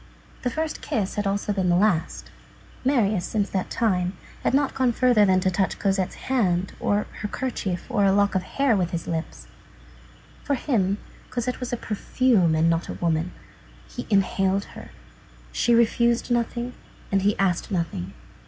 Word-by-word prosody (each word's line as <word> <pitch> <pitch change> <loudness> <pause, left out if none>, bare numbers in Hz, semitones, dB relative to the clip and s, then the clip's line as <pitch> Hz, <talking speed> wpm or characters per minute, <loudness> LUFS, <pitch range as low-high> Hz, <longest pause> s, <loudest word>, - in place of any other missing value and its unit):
The 250 - 0
first 315 +5 -3
kiss 200 -4 -2
had 205 -1 -1
also 200 +1 -1
been 190 -2 0
the 175 - +4
last. 180 -3 +1 0.5
Marius, 220 -8 +2
since 205 +1 -1
that 190 -2 -2
time, 185 -5 0 0.2
had - - +1
not 275 +1 +2
gone 260 -2 +2
further 245 -4 +4
than 185 -1 +4
to 185 - +1
touch 190 +1 0
Cosette's 195 -2 0
hand, 190 -8 +1
or 205 +1 +1
her 210 - -2
kerchief, 205 -7 -3
or 235 -6 +1
a 195 - +5
lock 200 +1 +3
of 190 - +1
her - - -14
hair, 275 -4 +2
with 180 -3 0
his 170 -2 -4
lips. 165 -1 -4 1.0
For 285 - 0
him, 205 -8 0 0.3
Cosette 250 +1 -2
was 250 -2 -4
a 245 - -1
perfume 210 -5 +2
and 160 +1 +3
not 165 0 0
a - - -3
woman. 165 +1 0 0.6
He - - -7
inhaled 195 -1 +2
her. - - -10 0.6
She 240 - +2
refused 235 +1 +2
nothing, 240 +1 -1 0.4
and 195 -1 +2
he 205 +2 +2
asked 185 -3 0
nothing. 165 - -3
200 Hz, 170 wpm, -24 LUFS, 185-235 Hz, 1.0 s, a